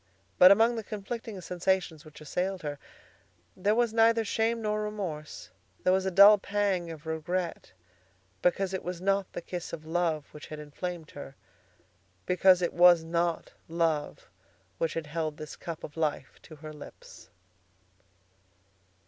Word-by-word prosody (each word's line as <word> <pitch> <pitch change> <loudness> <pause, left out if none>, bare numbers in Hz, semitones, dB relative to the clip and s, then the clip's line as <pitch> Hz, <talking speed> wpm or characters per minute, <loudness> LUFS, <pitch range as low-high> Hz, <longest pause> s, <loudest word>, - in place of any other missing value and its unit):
But 180 - +10
among 230 +3 +4
the 225 - -4
conflicting 215 0 -6
sensations 180 -2 -1
which 155 0 -14
assailed 180 +4 -3
her, 145 -1 -5 0.8
there 205 +3 +1
was 235 -1 +1
neither 225 0 +4
shame 225 +2 0
nor 215 -1 -1
remorse. 190 -8 -6 0.3
There 185 - +4
was 190 0 +1
a - - +2
dull 200 +3 +8
pang 195 -4 -1
of 160 -1 -9
regret 165 +2 -3 0.7
because 190 +2 +1
it 190 - -3
was 180 -1 -5
not 195 +1 0
the - - -6
kiss 175 -1 -6
of 155 - -7
love 160 -2 -1
which 150 - -11
had 155 - -7
inflamed 160 +2 -6
her, 140 -1 -10 0.9
because 180 0 +4
it 175 - -1
was 175 -1 +6
not 170 0 -1
love 165 -3 -1 0.5
which 165 - -1
had 165 -1 -3
held 155 0 -3
this 155 - -8
cup 165 -2 -7
of 150 - -8
life 155 -4 -3
to 155 - -13
her 155 +1 -10
lips. 150 - -13
175 Hz, 150 wpm, -29 LUFS, 160-195 Hz, 0.9 s, But